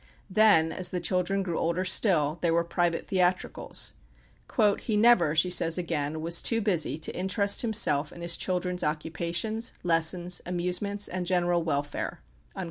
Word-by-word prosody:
Then, 200 -6 +4
as 180 -1 -1
the 180 - -2
children 185 +2 -1
grew 175 -3 -3
older 170 +3 -1
still, 170 -5 +2
there 165 -1 +1
were 170 - +2
private 170 0 -1
theatricals. 180 -1 0 0.9
"He 215 -3 -2
never," 210 -9 +4
she 180 +3 +2
says 165 -1 +3
again, 160 -3 -3
"was 170 +1 +2
too 230 - +1
busy 180 -9 -1
to 160 - -4
interest 200 +2 +1
himself 210 - +3
in 170 - -12
his 170 0 0
children's 180 -1 -2
occupations, 170 +8 -2
lessons, 175 +1 +1
amusements, 180 +3 -2
and 180 -1 -4
general 175 -1 +1
welfare." 145 -3 -4
175 Hz, 145 wpm, -27 LUFS, 165-190 Hz, 0.9 s, Then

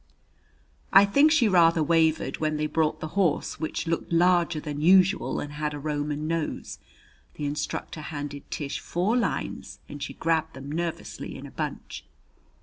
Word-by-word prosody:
I 195 +1 +8
think 280 +10 +4
she 290 -8 +4
rather 165 -4 +4
wavered 160 0 +2
when 155 -1 -1
they 150 - -1
brought 155 0 0
the 155 - -4
horse, 185 -3 0
which 155 - -3
looked 165 0 -2
larger 170 -1 +3
than 150 -1 -5
usual 190 +3 +4
and 145 0 -6
had 150 0 -3
a - - -6
Roman 150 0 -2
nose. 165 -1 -3 0.6
The 150 - -4
instructor 150 +2 -4
handed 145 -2 -6
Tish 145 -2 -4
four 185 +7 0
lines 245 - -2
and 145 - -9
she 140 - -5
grabbed 160 -1 0
them 135 +2 -8
nervously 170 +1 -4
in - - -9
a - - -10
bunch. - - -5
160 Hz, 160 wpm, -26 LUFS, 150-175 Hz, 0.6 s, I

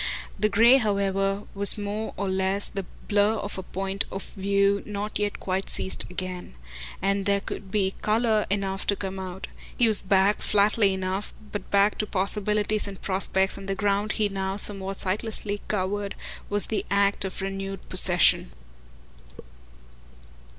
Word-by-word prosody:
The 215 +1 +2
grey, 230 +5 +6
however, 200 -3 0
was 200 +1 +5
more 210 +1 -4
or 200 - -2
less 190 +1 0
the 195 -2 -6 0.2
blur 205 +1 +2
of 200 -2 -4
a - - -3
point 195 +1 -3
of 195 - -5
view 200 0 +1
not 210 0 -5
yet 205 -1 -2
quite 190 +1 -3
seized 190 - 0
again; 180 - -6 0.5
and 195 0 0
there 200 0 +1
would 195 - -7
be 195 -1 0
colour 220 0 +1
enough 195 -1 -2
to 200 - +3
come 190 -1 -6
out. 185 0 -6 0.3
He 240 - +4
was 220 -2 +10
back, 195 +1 +2
flatly 205 0 +2
enough, 190 +1 -4 0.2
but 205 - -6
back 200 +1 +2
to 215 - -1
possibilities 210 +2 0
and 195 -1 -8
prospects, 190 0 0
and 195 - -9
the 195 - -1
ground 205 +1 0
he 215 - +1
now 195 0 -3
somewhat 195 -1 0
sightlessly 205 +1 +1
covered 200 0 -2 0.3
was 205 0 +2
the 220 - -2
act 200 0 +2
of 190 - -5
renewed 195 0 -5
possession. - - +4
200 Hz, 155 wpm, -25 LUFS, 195-205 Hz, 0.5 s, was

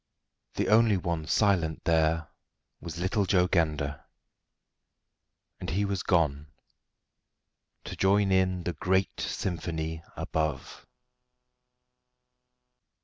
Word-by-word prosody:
The - - 0
only 110 -1 +5
one 85 -4 -3
silent 90 -7 +1
there 80 -1 +1 0.5
was 85 0 -7
little 95 +3 0
Joe 90 -2 +4
Gander 75 -5 0 1.6
and 90 - -5
he 100 +5 0
was 100 -2 -2
gone 75 -4 +1 1.4
to - - -7
join 100 0 +3
in 95 -1 +2
the 90 - -2
great 95 +4 0
symphony 80 -3 -3 0.2
above. 80 -3 -3
85 Hz, 90 wpm, -28 LUFS, 80-95 Hz, 1.6 s, only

